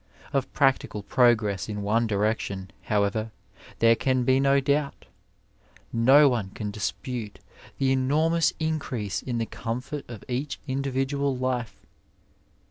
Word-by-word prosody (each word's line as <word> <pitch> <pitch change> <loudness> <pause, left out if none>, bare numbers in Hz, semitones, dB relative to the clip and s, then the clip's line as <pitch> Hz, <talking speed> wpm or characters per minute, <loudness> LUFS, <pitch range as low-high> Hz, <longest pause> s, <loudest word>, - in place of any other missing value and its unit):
Of 135 -2 0
practical 135 -7 +1
progress 110 -3 +2
in 105 -1 -4
one 115 +3 +2
direction, 100 -3 -1
however, 105 +1 0 0.5
there 115 0 +5
can 130 +1 +1
be 130 +2 +3
no 140 0 +4
doubt; 140 +1 -1 0.9
no 135 +6 +6
one 115 -7 0
can 105 -2 -4
dispute 110 +1 -4 0.4
the 135 -1 +2
enormous 155 +6 +2
increase 140 -10 -2
in 120 -2 -3
the 115 - 0
comfort 125 +6 -5
of 115 -4 -9
each 130 +3 -3
individual 135 0 -1
life. 125 -3 -2
125 Hz, 125 wpm, -26 LUFS, 110-135 Hz, 0.9 s, no